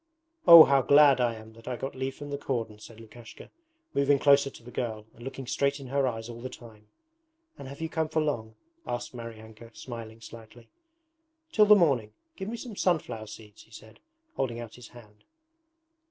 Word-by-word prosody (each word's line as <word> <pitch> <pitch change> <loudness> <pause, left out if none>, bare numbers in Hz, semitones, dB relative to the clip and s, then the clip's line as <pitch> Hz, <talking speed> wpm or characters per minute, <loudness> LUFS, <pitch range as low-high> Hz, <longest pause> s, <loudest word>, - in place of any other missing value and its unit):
'Oh, 170 -2 +12
how 140 -2 +3
glad 140 -1 +5
I 120 -2 +1
am 110 0 -13
that 115 0 -17
I 125 - -2
got 135 +3 -5
leave 130 0 -4
from 145 0 -9
the 140 - -2
cordon!' 115 -6 -4
said 110 +1 -13
Lukashka, 115 +1 -13 0.4
moving 140 0 +3
closer 140 0 +4
to 120 - -16
the 125 - -12
girl 110 -4 -4
and 120 - -15
looking 135 0 -7
straight 140 +3 -1
in 135 - -10
her 140 0 +1
eyes 115 -2 -4
all 120 0 -9
the 130 - -6
time. 110 -4 -14 0.7
'And 140 - -8
have 140 +3 -10
you 160 - -2
come 160 -1 -2
for 155 - 0
long?' 115 -8 -2 0.3
asked 120 +1 -4
Maryanka, 115 -1 -10
smiling 115 -2 -9
slightly. 115 +1 -14 0.8
'Till 210 -6 +4
the 210 - +9
morning. 135 - +2 0.2
Give 190 +1 -6
me 235 - -5
some 230 -2 -8
sunflower 125 - -1
seeds,' 105 -1 -13
he - - -22
said, 110 0 -14 0.4
holding 120 -3 -2
out 115 -2 -9
his 125 -2 -12
hand. 105 -3 -17
120 Hz, 195 wpm, -28 LUFS, 115-140 Hz, 0.8 s, Oh